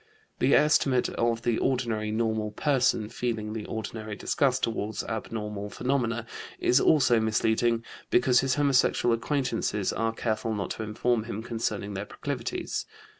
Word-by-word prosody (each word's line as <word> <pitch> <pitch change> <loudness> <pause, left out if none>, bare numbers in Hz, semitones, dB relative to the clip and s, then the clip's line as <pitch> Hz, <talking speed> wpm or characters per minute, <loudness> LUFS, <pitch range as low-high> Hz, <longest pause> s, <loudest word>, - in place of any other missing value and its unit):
The 135 - +4
estimate 140 -4 +3
of 115 0 0
the 120 -2 +1
ordinary 115 -5 0
normal 110 -1 0
person, 130 -2 +1
feeling 110 -3 -3
the 110 -2 -5
ordinary 110 -1 -5
disgust 130 +4 +1
toward 110 -1 -1
abnormal 105 -2 -4
phenomena, 120 -1 -1 0.3
is 125 - +3
also 130 -7 +4
misleading, 110 +1 +1 0.2
because 125 0 +4
his 135 -1 +1
homosexual 135 -4 +3
acquaintances 115 -5 -1
are 115 0 0
careful 110 -1 -2
not 100 -2 -3
to - - -4
inform 110 +1 0
him 110 -1 -5
concerning 110 -3 -3
their 100 +1 -4
proclivities. - - -4
115 Hz, 135 wpm, -27 LUFS, 110-125 Hz, 0.3 s, The